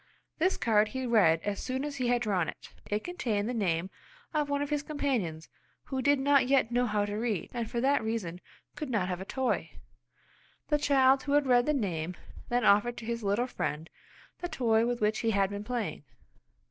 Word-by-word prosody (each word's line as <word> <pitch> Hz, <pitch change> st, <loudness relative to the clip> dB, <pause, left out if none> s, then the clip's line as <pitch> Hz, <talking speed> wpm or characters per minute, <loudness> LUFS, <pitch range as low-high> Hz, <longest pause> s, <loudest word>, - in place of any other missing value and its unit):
This 370 Hz, +4 st, +2 dB
card 215 Hz, -2 st, +3 dB
he 260 Hz, +3 st, -4 dB
read 195 Hz, -9 st, +4 dB
as 205 Hz, -1 st, -2 dB
soon 260 Hz, +2 st, -3 dB
as 290 Hz, -1 st, -5 dB
he 250 Hz, -2 st, 0 dB
had 245 Hz, 0 st, +2 dB
drawn 190 Hz, -7 st, 0 dB
it. -, -, -10 dB
It 210 Hz, +1 st, -1 dB
contained 230 Hz, -13 st, -2 dB
the 250 Hz, -, -2 dB
name 185 Hz, -4 st, -1 dB, 0.4 s
of 300 Hz, -2 st, 0 dB
one 285 Hz, 0 st, 0 dB
of 290 Hz, -, -6 dB
his 295 Hz, -1 st, +1 dB
companions 250 Hz, -, -2 dB, 0.4 s
who 265 Hz, -1 st, -3 dB
did 285 Hz, +1 st, +3 dB
not 280 Hz, -1 st, +4 dB
yet 265 Hz, -3 st, +3 dB
know 245 Hz, +1 st, +2 dB
how 210 Hz, -2 st, +1 dB
to 205 Hz, -, -5 dB
read, 220 Hz, -6 st, -2 dB
and 235 Hz, -2 st, -3 dB
for 240 Hz, -, -2 dB
that 275 Hz, 0 st, +2 dB
reason 200 Hz, -6 st, -3 dB, 0.3 s
could 300 Hz, -3 st, -5 dB
not 205 Hz, -7 st, 0 dB
have 180 Hz, 0 st, -3 dB
a -, -, -6 dB
toy. 260 Hz, +4 st, -1 dB, 1.0 s
The 295 Hz, -1 st, +2 dB
child 270 Hz, -2 st, +4 dB
who 285 Hz, -, -2 dB
had 290 Hz, -1 st, +4 dB
read 245 Hz, 0 st, +4 dB
the 300 Hz, -, +3 dB
name 180 Hz, -, -2 dB, 0.3 s
then 245 Hz, -1 st, +1 dB
offered 220 Hz, +4 st, +4 dB
to 230 Hz, -, -7 dB
his 235 Hz, 0 st, -3 dB
little 205 Hz, +4 st, +1 dB
friend 160 Hz, -10 st, -4 dB, 0.5 s
the 350 Hz, -, -4 dB
toy 230 Hz, -6 st, +2 dB
with 245 Hz, -1 st, -2 dB
which 215 Hz, +1 st, +1 dB
he 230 Hz, -, 0 dB
had 200 Hz, -2 st, +2 dB
been 205 Hz, 0 st, -5 dB
playing. 240 Hz, 0 st, -3 dB
235 Hz, 210 wpm, -30 LUFS, 205-270 Hz, 1.0 s, read